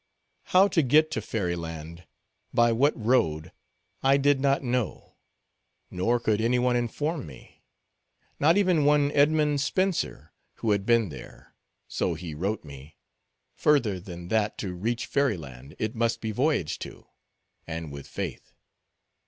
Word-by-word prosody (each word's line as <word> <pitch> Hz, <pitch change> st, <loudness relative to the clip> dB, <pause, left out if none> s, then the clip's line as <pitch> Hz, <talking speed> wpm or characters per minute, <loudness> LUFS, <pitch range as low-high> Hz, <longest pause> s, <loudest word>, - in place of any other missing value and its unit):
How 190 Hz, +2 st, +5 dB
to 170 Hz, -, +3 dB
get 155 Hz, +4 st, +4 dB
to 110 Hz, -, -2 dB
fairy 95 Hz, -5 st, -2 dB
land, 80 Hz, 0 st, -8 dB, 0.4 s
by 120 Hz, 0 st, +4 dB
what 135 Hz, +6 st, +2 dB
road, 80 Hz, -10 st, +1 dB, 0.5 s
I 135 Hz, +1 st, +4 dB
did 140 Hz, 0 st, +3 dB
not 140 Hz, +1 st, +1 dB
know; 125 Hz, -3 st, -3 dB, 0.7 s
nor 115 Hz, +7 st, +1 dB
could 110 Hz, -2 st, 0 dB
any 120 Hz, +2 st, +2 dB
one 125 Hz, 0 st, +2 dB
inform 135 Hz, -, -2 dB
me; 65 Hz, -4 st, -15 dB, 0.8 s
not 160 Hz, +6 st, +4 dB
even 180 Hz, -6 st, +3 dB
one 145 Hz, 0 st, +3 dB
Edmund 150 Hz, 0 st, +3 dB
Spenser, 185 Hz, +5 st, -1 dB, 0.2 s
who 110 Hz, -, -1 dB
had 100 Hz, 0 st, 0 dB
been 115 Hz, -4 st, +3 dB
there—so 75 Hz, +5 st, -6 dB
he 80 Hz, -1 st, -7 dB
wrote 95 Hz, +8 st, -2 dB
me—further 75 Hz, -, -3 dB
than 90 Hz, -2 st, -9 dB
that 105 Hz, -1 st, 0 dB
to 95 Hz, -3 st, -4 dB
reach 115 Hz, +7 st, -2 dB
fairy 140 Hz, -8 st, +1 dB
land, 70 Hz, -1 st, -11 dB
it 110 Hz, +1 st, -2 dB
must 115 Hz, -1 st, 0 dB
be 110 Hz, -1 st, -3 dB
voyaged 125 Hz, -, 0 dB
to, -, -, -9 dB, 0.6 s
and 80 Hz, -2 st, -5 dB
with 70 Hz, -1 st, -9 dB
faith. -, -, -6 dB
115 Hz, 140 wpm, -27 LUFS, 85-140 Hz, 0.8 s, How